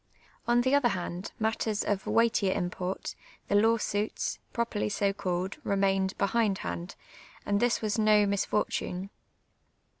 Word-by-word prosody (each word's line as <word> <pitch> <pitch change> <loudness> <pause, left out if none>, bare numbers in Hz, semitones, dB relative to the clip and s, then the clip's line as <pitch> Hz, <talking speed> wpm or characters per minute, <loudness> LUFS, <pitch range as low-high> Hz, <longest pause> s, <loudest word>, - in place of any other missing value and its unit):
On 240 0 +4
the 260 +2 +1
other 285 -3 +5
hand, 180 -1 -4
matters 220 -1 0
of 200 -2 -1
weightier 225 -4 +2
im])ort, 180 +1 -3 0.4
the - - 0
law 225 +3 +5
suits, 210 -1 -2
pro 235 - 0
perly 210 -2 -2
so 200 0 +1
called, 185 -1 -2
ri'mained 195 -1 +1
behindhand, 195 - -1 0.5
and 205 0 +1
this 240 0 +1
was 215 +1 0
no 215 -1 +5
mis 200 -1 +1
fortune. 190 -2 -2
205 Hz, 140 wpm, -29 LUFS, 190-220 Hz, 0.5 s, other